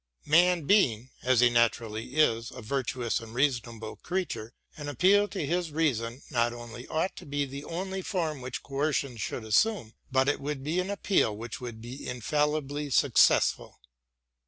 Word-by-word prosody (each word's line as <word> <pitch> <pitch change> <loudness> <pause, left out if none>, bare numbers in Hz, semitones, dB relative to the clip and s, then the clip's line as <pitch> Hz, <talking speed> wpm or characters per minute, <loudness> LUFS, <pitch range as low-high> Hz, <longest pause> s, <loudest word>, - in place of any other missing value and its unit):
Man 175 +2 +4
being, 130 - +3
as 125 -1 +3
he 120 -1 +5
naturally 115 +1 0
is, 115 -6 +2
a 125 -2 -10
virtuous 125 -1 -1
and 115 0 -11
reasonable 120 -5 -1
creature, 175 -11 -4 0.2
an 145 -1 -6
appeal 195 - +4
to 195 -7 -3
his 175 +2 -1
reason 130 -6 -1
not 120 -2 +1
only 120 +1 -9
ought 160 +4 -1
to - - -9
be 145 0 -1
the 140 +1 -7
only 190 +3 -4
form 165 -7 -2
which 125 0 -5
coercion 140 -2 -1
should 115 +1 -4
assume, 115 - +1 0.2
but 130 0 +3
it 145 - +1
would 140 -1 -4
be 160 +5 0
an 185 +1 -2
appeal 195 - +1
which 115 +3 -7
would 120 -3 -7
be 125 +4 -8
infallibly 145 +3 -1
successful. 130 - +3
135 Hz, 160 wpm, -28 LUFS, 120-155 Hz, 0.2 s, he